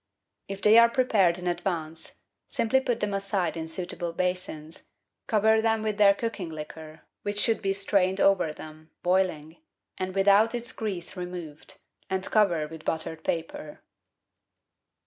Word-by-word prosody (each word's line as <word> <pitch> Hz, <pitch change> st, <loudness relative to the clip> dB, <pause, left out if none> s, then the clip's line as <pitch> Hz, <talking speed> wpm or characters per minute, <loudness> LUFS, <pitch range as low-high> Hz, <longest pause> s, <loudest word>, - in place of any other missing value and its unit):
If 195 Hz, 0 st, -7 dB
they 215 Hz, +2 st, +8 dB
are 235 Hz, 0 st, +7 dB
prepared 215 Hz, -9 st, +3 dB
in 180 Hz, -, -7 dB
advance, 165 Hz, -3 st, -3 dB, 0.3 s
simply 260 Hz, +4 st, +1 dB
put 250 Hz, -3 st, -2 dB
them 210 Hz, -1 st, -1 dB
aside 195 Hz, -4 st, -1 dB
in 160 Hz, -1 st, -4 dB
suitable 175 Hz, 0 st, -4 dB
basins, 175 Hz, -3 st, -4 dB, 0.4 s
cover 220 Hz, +1 st, +3 dB
them 225 Hz, -1 st, +1 dB
with 215 Hz, -1 st, -2 dB
their 200 Hz, -1 st, +6 dB
cooking 215 Hz, -6 st, -4 dB
liquor, 155 Hz, 0 st, -9 dB, 0.2 s
which 205 Hz, 0 st, -3 dB
should 225 Hz, +1 st, +2 dB
be 195 Hz, -2 st, 0 dB
strained 195 Hz, -1 st, +1 dB
over 195 Hz, -6 st, +3 dB
them, 155 Hz, +1 st, -12 dB
boiling, 175 Hz, -4 st, 0 dB, 0.4 s
and 185 Hz, 0 st, -3 dB
without 200 Hz, +4 st, +4 dB
its 240 Hz, -1 st, -4 dB
grease 190 Hz, -6 st, -4 dB
removed, 180 Hz, -1 st, -7 dB, 0.3 s
and 190 Hz, 0 st, -1 dB
cover 175 Hz, -8 st, +3 dB
with 160 Hz, 0 st, -10 dB
buttered 160 Hz, 0 st, -2 dB
paper. 160 Hz, -2 st, -4 dB
185 Hz, 145 wpm, -27 LUFS, 165-210 Hz, 0.4 s, they